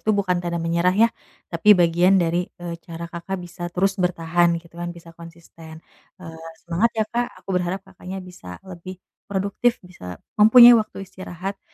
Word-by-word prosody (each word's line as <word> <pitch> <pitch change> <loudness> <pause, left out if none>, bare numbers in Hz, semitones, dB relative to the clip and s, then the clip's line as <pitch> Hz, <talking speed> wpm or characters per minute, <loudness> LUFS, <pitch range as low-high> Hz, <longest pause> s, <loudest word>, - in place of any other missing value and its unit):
itu 215 - 0
bukan 180 -3 0
tanda 175 -1 -3
menyerah, 170 +2 +1
ya, 230 - +6 0.4
tapi 170 +5 -1
bagian 175 +2 +4
dari, 170 -2 +1 0.2
eee, 170 -1 -5
cara 165 0 -8
Kakak 170 +3 -5
bisa 175 +1 -11
terus 185 +3 0
bertahan, 175 -1 +1
gitu, 170 0 -12
kan, 175 - -3
bisa 170 0 -14
konsisten. 165 -1 -14 0.3
Eee, 165 -3 -10 0.2
semangat, 175 +7 +1
ya, 220 - +2
Kak. 240 +1 0 0.2
Aku - - -45
berharap 180 +1 -1
Kakaknya 190 0 -9
bisa 90 - -11
lebih 185 0 -9 0.3
produktif, 200 +4 0
bisa 90 - -10 0.2
mempunyai 240 +3 +9
waktu 215 -2 -7
istirahat 190 +1 -7
175 Hz, 165 wpm, -22 LUFS, 170-195 Hz, 0.4 s, mempunyai